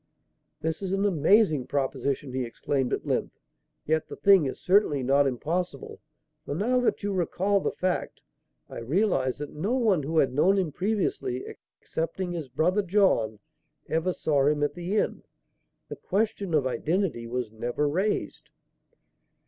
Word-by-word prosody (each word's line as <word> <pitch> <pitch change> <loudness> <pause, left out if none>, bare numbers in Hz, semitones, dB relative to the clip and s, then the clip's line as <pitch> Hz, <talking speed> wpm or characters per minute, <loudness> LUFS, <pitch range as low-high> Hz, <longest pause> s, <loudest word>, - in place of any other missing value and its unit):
"This 160 +2 -2
is 190 -1 -2
an 195 +1 +1
amazing 165 - +3
proposition!" 140 -1 -2
he 130 0 -1
exclaimed, 125 +2 -2
at - - -2
length. - - -2 0.5
"Yet 160 0 0
the - - -8
thing 195 -7 +5
is 130 - -5
certainly 180 -8 +3
not 140 +2 +3
impossible, 150 +3 -3 0.4
for, 145 - -4
now 240 +9 +1
that 245 - 0
you 205 0 -1
recall 190 +3 +1
the - - -1
fact, 185 -1 -2 0.5
I - - -8
realize 135 - +1
that 145 0 -7
no 190 +10 -2
one 215 -10 +2
who 160 +4 -2
had 135 -4 +3
known 185 +8 +3
him 180 -5 0
previously 180 - -1 0.3
excepting 165 +3 -3
his 165 -6 -5
brother, 180 +10 +1
John 185 - +2 0.5
ever 165 +3 0
saw 145 -5 +1
him 150 0 +2
at 145 - 0
the 175 +4 -3
inn. - - 0 0.7
The - - -7
question 200 -3 -1
of 145 -3 +2
identity 155 -2 -1
was 120 -2 -3
never 120 +6 -1
raised." 190 +8 -2
160 Hz, 155 wpm, -27 LUFS, 135-195 Hz, 0.7 s, thing